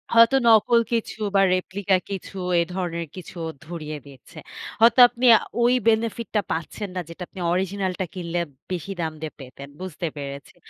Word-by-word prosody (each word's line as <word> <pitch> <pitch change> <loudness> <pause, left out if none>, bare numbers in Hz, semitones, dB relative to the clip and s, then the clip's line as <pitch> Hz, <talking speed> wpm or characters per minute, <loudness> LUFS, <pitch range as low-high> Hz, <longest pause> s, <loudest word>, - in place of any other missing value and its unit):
হয়তো 230 +3 +7
নকল 225 +1 +6
কিছু 230 -2 -2 0.2
বা 195 - +6
রেপ্লিকা 190 +1 0
কিছু 195 0 -6 0.2
এ - - +4
ধরনের 170 -3 -3
কিছু 185 0 -10 0.3
ধরিয়ে 155 -2 -6
দিচ্ছে। 135 -3 -16 0.4
হয়তো 235 +3 +6
আপনি 245 +1 -3 0.4
ওই 240 +1 +4
বেনিফিট 230 +1 +1
টা 210 - +4
পাচ্ছেন 170 +5 -4
না - - -1
যেটা 170 +2 -7
আপনি 190 - -12
অরিজিনাল 190 +1 -1
টা 190 - 0
কিনলে 175 -1 -3 0.3
বেশি 185 +2 -4
দাম 160 -1 -1
দিয়ে 155 -1 -4
পেতেন। 135 +1 -10
বুঝতে 180 -2 -4
পেরেছি। 140 -1 -7
185 Hz, 165 wpm, -24 LUFS, 165-215 Hz, 0.4 s, হয়তো